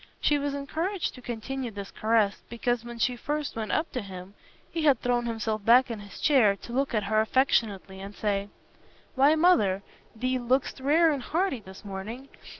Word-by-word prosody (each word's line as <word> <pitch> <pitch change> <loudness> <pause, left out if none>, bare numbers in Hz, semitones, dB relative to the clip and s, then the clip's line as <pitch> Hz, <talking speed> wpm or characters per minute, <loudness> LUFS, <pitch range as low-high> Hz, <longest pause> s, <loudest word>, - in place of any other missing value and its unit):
She 295 -1 +2
was 285 0 -2
encouraged 325 +7 -2
to 250 - -12
continue 245 +2 -4
this 200 -2 -8
caress, 215 -2 +1
because 235 0 -1
when 240 0 -8
she 245 +2 +1
first 295 +4 -3
went 220 -1 -3
up 315 +2 0
to 250 - -3
him, 190 -1 -9 0.4
he 330 - -2
had 275 -6 +5
thrown 245 -1 0
himself 220 -2 -2
back 245 +3 +5
in 225 - -4
his 205 -1 -11
chair 245 -10 +4
to 235 +4 -10
look 270 -1 0
at 210 - +1
her 215 +2 +2
affectionately 215 -5 +1
and 200 +1 -8
say, 200 -1 -1 0.6
"Why, 280 +4 +5
Mother, 310 - +3 0.3
thee 255 +3 -1
look'st 255 +3 0
rare 315 +5 +4
and 280 -3 -2
hearty 335 -2 0
this 190 0 -13
morning. 215 +7 -7
240 Hz, 185 wpm, -27 LUFS, 210-275 Hz, 0.6 s, had